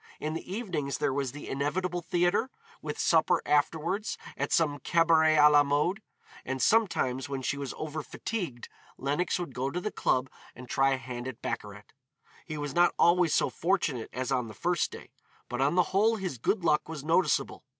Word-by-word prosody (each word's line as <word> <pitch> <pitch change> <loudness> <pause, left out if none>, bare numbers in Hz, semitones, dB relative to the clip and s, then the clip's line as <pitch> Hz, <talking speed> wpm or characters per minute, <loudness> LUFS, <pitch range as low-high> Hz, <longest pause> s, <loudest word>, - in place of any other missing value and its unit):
In 155 +1 -3
the 165 +2 -6
evenings 170 - -3
there 135 - 0
was 135 -2 -1
the 145 +2 -9
inevitable 175 +6 -2
theatre, 175 +8 +1 0.3
with - - -5
supper - - +3
afterwards 165 +7 0 0.2
at - - -3
some 145 -3 +2
cabaret 160 +1 +4
à 150 0 +7
la 145 0 +7
mode. 150 +8 +1 0.4
And 130 +1 -3
sometimes 135 - +2
when 135 -2 -4
she 140 - 0
was 140 -2 -5
over 155 0 -4
fatigued, 170 - -5 0.3
Lenox 145 +7 -1
would 170 -7 -5
go 130 +2 -2
to 175 - -3
the 215 +4 -3
club 130 +1 +1 0.3
and 125 0 -10
try 135 +1 +2
a - - 0
hand 125 0 -6
at 130 -1 -8
baccarat. 105 -3 -5 0.6
He 155 -2 -5
was 145 -2 -4
not 175 +2 +4
always 170 -1 +4
so - - +2
fortunate 165 - -1
as 130 +2 -3
on 125 -3 0
the 110 - -10
first 175 -1 0
day, - - -11 0.4
but 125 +1 -3
on 145 +5 +2
the 180 - +5
whole 220 +4 +4
his 185 - -4
good 190 - 0
luck 150 -1 +2
was 155 -4 -6
noticeable. 165 +4 +1
150 Hz, 190 wpm, -29 LUFS, 135-175 Hz, 0.6 s, à